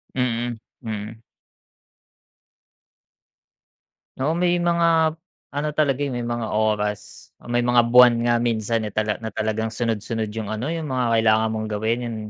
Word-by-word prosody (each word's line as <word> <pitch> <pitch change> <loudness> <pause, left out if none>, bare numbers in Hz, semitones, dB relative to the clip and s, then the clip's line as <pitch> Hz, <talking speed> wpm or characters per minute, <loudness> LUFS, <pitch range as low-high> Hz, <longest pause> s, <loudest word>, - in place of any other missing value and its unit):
Mm, 120 -2 -1 0.2
mm. 110 0 -6 3.0
Oo, 150 +5 0
may 175 0 +2
mga, 170 -2 +2 0.4
ano, 145 +1 -1
talaga, 145 -2 +1
eh, 140 - -2
may 120 - -3
mga 120 -2 -3
oras 105 -1 -2
o - - -15
may 120 0 +1
mga 120 -1 +4
buwan 120 -1 +7
nga 120 - +3
minsan 115 -1 0
na 105 - -4
tala 105 +1 0
na 110 - -4
talagang 110 +1 -2
sunod-sunod 110 -1 -2
yung, 110 -2 -4
ano, 110 +5 -3
yung 160 -3 -3
mga 125 -3 +1
kailangan 110 0 +3
mong 110 0 -3
gawin 110 +3 -1
yun 120 -1 -4
115 Hz, 145 wpm, -23 LUFS, 110-130 Hz, 3.0 s, buwan